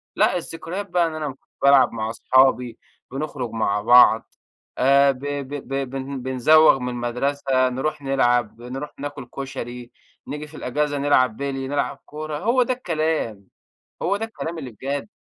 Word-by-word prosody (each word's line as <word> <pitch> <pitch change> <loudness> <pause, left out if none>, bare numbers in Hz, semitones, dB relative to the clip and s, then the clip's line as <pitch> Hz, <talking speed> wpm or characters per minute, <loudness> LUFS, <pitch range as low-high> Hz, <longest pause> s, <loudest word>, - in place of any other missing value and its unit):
لأ - - +3
الذكريات 175 +4 -6
بقى 175 -1 +2
إن 160 - -6
أنا 150 -4 -4 0.3
بالعب 140 -1 +6
مع 110 -1 -3
أصحابي 125 0 +2 0.3
بنخرج 135 -3 -4
مع 105 -2 0
بعض 120 0 +6 0.4
آآ 140 +2 +5
ب 130 - -9
ب 145 -1 -4
ب 135 -1 -2
بن 135 0 -5
بنزوغ 135 +4 +5
من 125 0 -3
المدرسة، 130 +2 0
نروح 135 +4 -3
نلعب، 120 -4 +1
بنروح 130 +5 -7
ناكل 145 -2 -6
كشري، 125 -2 -7 0.4
نيجي 150 +1 -6
في 150 - -12
الإجازة 145 +3 -1
نلعب 130 -5 +2
بِلْي، 135 -1 -3
نلعب 140 +1 -2
كورة، 155 0 -6
هو 235 - +2
ده 255 - 0
الكلام 155 - -2 0.6
هو، 200 - +1
ده 220 - -3
الكلام 170 -7 -6
اللي 135 -5 -6
بجد. 135 - -4
135 Hz, 155 wpm, -22 LUFS, 125-150 Hz, 0.6 s, بالعب